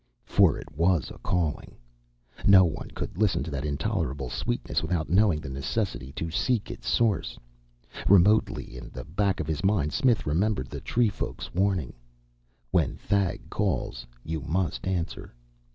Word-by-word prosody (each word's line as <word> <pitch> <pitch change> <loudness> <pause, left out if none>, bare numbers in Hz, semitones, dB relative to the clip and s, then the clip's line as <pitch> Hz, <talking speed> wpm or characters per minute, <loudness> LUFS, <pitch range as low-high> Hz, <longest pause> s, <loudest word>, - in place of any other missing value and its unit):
For - - +4
it - - -8
was 85 -1 +2
a - - -11
calling. 85 -4 -2 0.7
No 95 -2 +8
one 80 - -4
could 90 - -6
listen 105 -10 +2
to 80 - -6
that 70 -1 -3
intolerable 75 - -2
sweetness - - -1
without 80 0 -2
knowing 95 -4 +4
the 75 - -7
necessity 70 - -3
to 80 +2 -4
seek 115 +5 0
its - - -6
source. 110 -7 +1 0.7
Remotely 100 - +4
in - - -8
the 65 +1 -8
back 95 +6 0
of 75 - -1
his 80 +1 -3
mind 95 -7 +2
Smith 120 -4 +2
remembered 80 -1 0
the - - -6
tree 120 -2 +2
folk's 100 - -6
warning, 95 -6 0 0.8
"When - - +2
Thag 100 -3 -1
calls, - - -1 0.2
you 80 -1 -3
must 80 -3 -1
answer." 85 -8 -3
85 Hz, 150 wpm, -27 LUFS, 75-100 Hz, 0.8 s, No